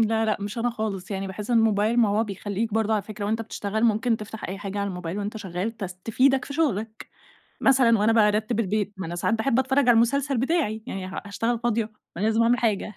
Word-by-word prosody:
لا 225 0 +2
لأ، 215 -2 +1
مش 205 +3 -5
أنا 240 +1 +1
خالص. 215 -4 -4
يعني 195 -1 -3
باحس 200 +4 -6
الموبايل 225 -1 +3
ما 225 - +4
هو 210 +3 +1
بيخلّيك 205 +1 -3
برضه 220 0 +1
على 210 - 0
فكرة، 210 0 -7
وأنت 220 +2 -1
بتشتغل 220 0 -2
ممكن 225 +1 +2
تفتح 215 0 -8
أي 190 +2 -5
حاجة 200 0 -5
على 200 0 -1
الموبايل 180 0 -5
وأنت 205 +2 -4
شغّال 200 +2 -4
تس 190 -4 -5
تفيدك 260 +3 +3
في 280 - -7
شُغلك. 225 -8 -1 0.5
مثلًا 250 -4 +5
وأنا 215 +2 +3
بارتِّب 215 +1 +2
البيت، 210 -1 -1
ما 190 - -4
أنا 170 +1 -5
ساعات 175 +6 0
باحب 230 +3 +1
أتفرّج 265 +1 +2
على 250 -3 +5
المسلسل 265 +4 +2
بتاعي. 250 -5 0
يعني 190 -5 -4
ه 185 - -5
هاشتغل 230 +3 -1
فاضية؟ 230 -1 +1
ما 220 - -14 0.3
أنا 190 - -2
لازم 225 +1 +3
أعمل 240 +1 +3
حاجة، 215 -2 0
220 Hz, 225 wpm, -25 LUFS, 205-230 Hz, 0.5 s, مثلًا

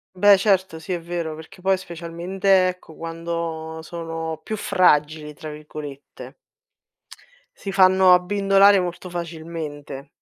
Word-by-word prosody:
Beh, 200 +1 +6
certo, 185 -5 +1
sì, 175 - -8
è 175 - -2
vero. 170 -2 -4
Perché 160 +3 -13
poi, 190 0 +2
specialmente, 185 +2 0
ecco, 180 -3 -7
quando 165 -1 -5
sono 165 -1 -5
più 215 +4 -4
"fragili", 150 -5 +2
tra 155 - -8
virgolette. 150 -2 -10 1.2
Si 195 - -6
fanno 190 -1 +6
abbindolare 195 +2 +4
molto 180 0 -4
facilmente. 160 -5 -7
170 Hz, 115 wpm, -22 LUFS, 160-185 Hz, 1.2 s, Beh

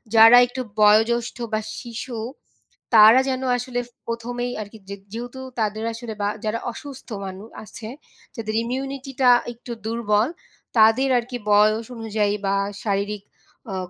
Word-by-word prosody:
যারা 225 +2 +9
একটু 250 +1 -5 0.2
বয়োজ্যেষ্ঠ 225 +4 +4 0.2
বা 215 - +2 0.2
শিশু 235 0 -7 0.8
তারা 220 +3 +9
যেন 260 0 -2 0.2
আসলে 245 0 -3 0.3
প্রথমেই 240 +1 -3
আর 210 - -6
কি 220 - -12
যে 200 - -4 0.2
যেহেতু 245 +3 -6 0.2
তাদের 215 0 -1
আসলে 230 0 -7
বা 205 - +1 0.2
যারা 215 +2 -1
অসুস্থ 270 +2 -10 0.2
মানু 190 +2 -8 0.2
আছে, 215 0 -10 0.5
যাদের 220 -3 -4
ইমিউনিটিটা 265 +1 -1 0.2
একটু 240 +1 -11
দুর্বল, 220 -1 +1 0.5
তাদের 225 +5 +5
আর 240 - 0
কি 245 - -2
বয়স 215 +2 +4
অনুযায়ী 215 -2 -1
বা 195 - +2 0.3
শারীরিক 205 0 -2 0.5
আ - - -3
225 Hz, 140 wpm, -23 LUFS, 215-245 Hz, 0.8 s, যারা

